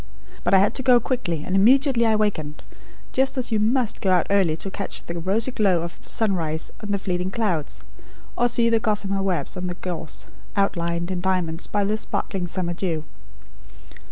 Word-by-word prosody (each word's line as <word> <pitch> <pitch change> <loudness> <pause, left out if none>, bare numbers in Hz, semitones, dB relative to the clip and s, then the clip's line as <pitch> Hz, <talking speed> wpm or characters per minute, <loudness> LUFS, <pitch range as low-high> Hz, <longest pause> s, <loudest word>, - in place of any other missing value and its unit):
But - - +4
I - - +8
had 200 +3 +3
to - - 0
go 250 -2 +6
quickly, 175 - -2
and 185 - -2
immediately 245 +3 +4
I 220 - +3
wakened; 160 -9 -1 0.5
just 265 +1 +1
as 255 -2 -2
you 220 - +2
must 230 +2 +1
go 195 - +1
out 180 -3 +4
early 185 -6 +3
to 195 - -5
catch 200 0 -6
the 170 0 -4
rosy 205 +9 +2
glow 190 -8 +2
of 170 - -7
sunrise 165 -7 0
on 210 - -6
the 200 - +1
fleeting 180 -1 -2
clouds; 190 -8 -1 0.5
or 240 - +2
to - - +5
see 235 -1 +4
the 230 -1 +3
gossamer 205 -3 0
webs 180 -7 -1
on 180 0 -3
the 175 - -4
gorse, 175 -3 -5 0.3
outlined 170 -3 0
in 180 -1 -2
diamonds, 180 -3 0
by 205 -1 0
the 210 +2 0
sparkling 190 -4 -3
summer 175 0 -1
dew. 170 -3 -2
195 Hz, 190 wpm, -23 LUFS, 175-220 Hz, 0.5 s, I